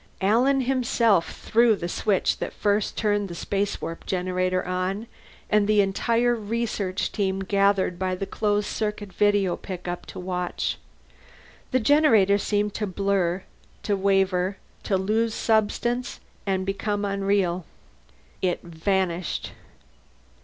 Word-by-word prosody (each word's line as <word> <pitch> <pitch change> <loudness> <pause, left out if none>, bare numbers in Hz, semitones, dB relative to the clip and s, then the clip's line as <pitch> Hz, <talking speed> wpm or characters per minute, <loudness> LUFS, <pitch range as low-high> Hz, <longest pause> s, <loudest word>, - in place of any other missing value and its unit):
Alan 250 +8 +3
himself 235 -7 +2
threw 230 0 +3
the 175 - -4
switch 195 +2 0
that - - -4
first 205 0 0
turned 205 -2 +1
the 170 - -6
spacewarp 195 -3 -3
generator 185 0 0
on, 185 +4 -2 0.4
and 210 -1 +3
the 210 -1 +4
entire 230 +5 +2
research 220 -4 -2
team 195 -2 -1
gathered 195 -2 +2
by 185 -1 0
the 195 - -4
closed 205 0 0
circuit 210 -3 -3
video 205 -2 +2
pickup 180 -2 -6
to - - -8
watch. 180 -1 -2 0.9
The 255 - +2
generator 225 -7 +4
seemed 205 0 0
to 210 - -2
blur, 190 -1 0 0.4
to 205 - +1
waver, 195 -1 +1 0.3
to 195 - +2
lose 220 +4 0
substance 235 +3 0 0.3
and 190 -1 0
become 205 +1 -1
unreal. 195 -3 0 0.8
It 180 -2 0
vanished. 175 +1 -1
200 Hz, 120 wpm, -25 LUFS, 185-215 Hz, 0.9 s, the